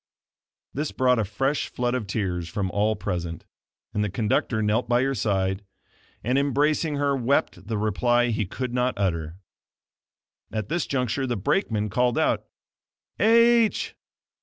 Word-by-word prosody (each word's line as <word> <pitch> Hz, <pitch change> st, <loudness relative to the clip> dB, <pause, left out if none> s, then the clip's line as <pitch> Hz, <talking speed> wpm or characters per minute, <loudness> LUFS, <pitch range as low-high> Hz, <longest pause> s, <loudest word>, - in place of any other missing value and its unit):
This 150 Hz, +2 st, -2 dB
brought 125 Hz, -2 st, +2 dB
a -, -, +2 dB
fresh 135 Hz, +8 st, -1 dB
flood 125 Hz, 0 st, -2 dB
of 125 Hz, -5 st, -2 dB
tears 90 Hz, -4 st, -2 dB
from 95 Hz, +1 st, -2 dB
all 105 Hz, +3 st, +1 dB
present, 85 Hz, -4 st, -4 dB, 0.5 s
and 105 Hz, -, 0 dB
the 105 Hz, -, -1 dB
conductor 110 Hz, +2 st, 0 dB
knelt 110 Hz, +4 st, +1 dB
by 120 Hz, +1 st, +3 dB
her 135 Hz, +1 st, +1 dB
side, 95 Hz, -4 st, 0 dB, 0.6 s
and, 125 Hz, +4 st, +2 dB
embracing 150 Hz, +2 st, +1 dB
her 140 Hz, -1 st, +1 dB
wept 130 Hz, -4 st, 0 dB
the 110 Hz, -1 st, -1 dB
reply 120 Hz, +4 st, +2 dB
he 105 Hz, -3 st, -1 dB
could 125 Hz, +5 st, -4 dB
not 125 Hz, +1 st, +1 dB
utter. 85 Hz, -5 st, -1 dB, 1.2 s
At 110 Hz, -1 st, -3 dB
this 175 Hz, -, -1 dB
juncture 130 Hz, 0 st, -1 dB
the 120 Hz, -, -1 dB
brakeman 105 Hz, -, 0 dB
called 125 Hz, +3 st, +2 dB
out: -, -, +1 dB, 0.7 s
"H 230 Hz, 0 st, +4 dB
120 Hz, 145 wpm, -25 LUFS, 105-135 Hz, 1.2 s, H